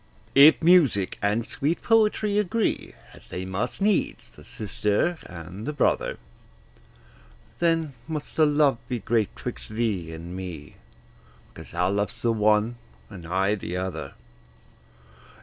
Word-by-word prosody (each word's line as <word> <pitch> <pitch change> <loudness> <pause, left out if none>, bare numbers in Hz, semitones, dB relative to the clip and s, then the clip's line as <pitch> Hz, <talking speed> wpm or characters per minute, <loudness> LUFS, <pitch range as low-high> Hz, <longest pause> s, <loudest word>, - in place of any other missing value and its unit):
If 145 +4 +7
music 150 - +4
and 105 +3 +1
sweet 150 +7 -2
poetry 215 -2 +3
agree, 210 +2 -1 0.2
As - - -15
they 90 +1 -5
must 95 - -3
needs, 205 -2 0
the - - -16
sister 105 - -1
and 90 - -9
the 150 - -2
brother, - - +1 1.4
Then 165 -4 +1
must 155 -2 -5
the 155 -1 +5
love 145 -4 +3
be 125 - -1
great 110 -1 0
'twixt - - -7
thee 110 -7 -2
and 85 +2 -8
me, 90 -6 -8 0.8
Because - - -11
thou 90 +1 0
lovest 105 +3 -2
the 115 -1 +3
one, 110 +2 +2 0.3
and 90 -5 -9
I 95 +4 +1
the 90 -3 -4
other. 90 -7 -5
110 Hz, 130 wpm, -25 LUFS, 95-155 Hz, 1.4 s, If